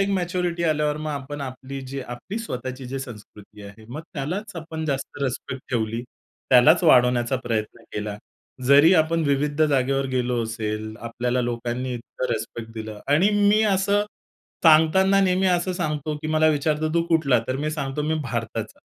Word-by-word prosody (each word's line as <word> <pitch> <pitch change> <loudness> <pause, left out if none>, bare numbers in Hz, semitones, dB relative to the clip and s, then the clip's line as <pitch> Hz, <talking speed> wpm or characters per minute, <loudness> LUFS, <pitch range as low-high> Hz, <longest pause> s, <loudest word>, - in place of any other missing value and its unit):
एक 195 - +2
मॅच्युरिटी 180 -2 -1
आल्यावर 150 -2 +1
मग, 155 0 -4
आपण 145 0 -5
आपली, 135 0 -6
जी 135 +1 -6
आपली 125 - -6
स्वतःची 130 - -5
जी 135 +2 -4
संस्कृती 105 -4 -11
आहे. 100 +2 -12
मग 145 +7 -6
त्यालाच 180 +8 -4
आपण 160 0 -6
जास्त 135 -1 -3
रिस्पेक्ट 130 0 -3
ठेवली. 115 -1 -1 0.5
त्यालाच 150 +7 +6
वाढवण्याचा 125 -5 +4
प्रयत्न 110 -2 -3
केला, 105 -1 -4 0.5
जरी 145 +5 +7
आपण 165 0 +2
विविध 145 +2 +1
जागेवर 135 -2 +2
गेलो 125 -2 0
असेल, 110 -1 -4
आपल्याला 120 +2 -1
लोकांनी 120 +1 -3
इतकं 120 +1 -4
रिस्पेक्ट 115 0 -5
दिलं. 110 -1 -6
आणि 180 +8 +4 0.2
मी 215 +1 +4
असं 200 +2 +2 0.6
सांगताना 170 +5 +5
नेहमी 190 0 +2
असं 180 0 +1
सांगतो, 155 -4 -2
की 150 +1 -6
मला 155 0 +3
विचारतो, 155 +1 +1
"तू 170 - +3
कुठला?" 155 -7 +3
तर 130 - 0
मी 155 - -1
सांगतो, 150 -1 -3
"मी 155 +1 0
भारताचा." 115 -3 -4
140 Hz, 160 wpm, -24 LUFS, 120-160 Hz, 0.6 s, जरी